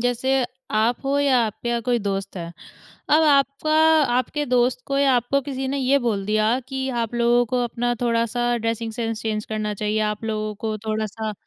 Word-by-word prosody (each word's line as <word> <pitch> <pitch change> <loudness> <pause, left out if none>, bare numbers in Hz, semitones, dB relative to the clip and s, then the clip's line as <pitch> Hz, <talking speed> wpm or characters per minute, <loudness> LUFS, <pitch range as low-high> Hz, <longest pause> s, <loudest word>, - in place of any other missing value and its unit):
जैसे 245 +2 +1 0.3
आप 230 +5 +1
हो 280 +1 +1
या 275 -3 +3
आपके 220 +2 -5
या 235 0 0
कोई 245 -1 +2
दोस्त 195 -2 -3
है। 170 -1 -5 0.6
अब 310 +2 +5
आपका 280 +1 +2 0.4
आपके 275 +4 0
दोस्त 250 0 +2
को 275 0 0
या 275 -2 +4
आपको 245 +4 +1
किसी 265 -1 -4
ने 280 +1 -1
ये 270 +2 +3
बोल 215 -6 -1
दिया 215 +3 +2
कि 265 -1 -3
आप 230 +1 -4
लोगों 240 +1 +3
को 250 +1 0
अपना 240 +1 -1
थोड़ा-सा 240 0 0
ड्रेसिंग 230 0 -2
सेन्स 225 -1 -3
चैंज 215 -1 -2
करना 215 -1 -3
चाहिए। 210 +1 -1
आप 210 +1 -6
लोगों 215 -1 -2
को 215 +1 -3
थोड़ा-सा 215 0 -2
240 Hz, 190 wpm, -23 LUFS, 215-260 Hz, 0.6 s, अब